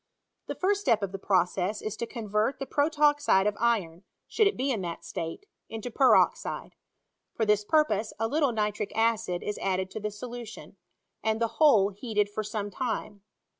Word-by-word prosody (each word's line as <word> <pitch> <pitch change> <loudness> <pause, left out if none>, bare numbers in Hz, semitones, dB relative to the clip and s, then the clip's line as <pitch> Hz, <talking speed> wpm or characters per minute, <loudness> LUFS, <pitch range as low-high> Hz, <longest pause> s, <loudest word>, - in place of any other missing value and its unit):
The - - -4
first 400 +2 +1
step 230 - +2
of 195 - -2
the 195 - -6
process 190 +1 +1
is 215 0 -4
to 235 - -3
convert 220 +1 -1
the 270 - -4
protoxide 290 -8 +3
of 210 -1 +1
iron 200 -8 0 0.3
(should 430 - +3
it 405 - -1
be 270 +2 0
in 220 -6 -1
that 170 -2 -6
state) 165 - -5 0.2
into 225 +2 -6
peroxide. 285 - +2 0.6
For 220 - 0
this 210 -1 +3
purpose, 215 -5 +1
a 225 - +1
little 285 +1 +1
nitric 210 -2 -2
acid 225 -5 0
is 210 - -4
added 190 -1 -1
to - - -5
the 210 0 -3
solu 240 +3 -7
tion, - - -12 0.5
and 220 0 0
the 230 -1 -2
whole 220 -10 +6
heated 210 0 -1
for 215 - -2
some 210 -1 -4
time. 215 -3 -4
220 Hz, 180 wpm, -28 LUFS, 205-250 Hz, 0.6 s, whole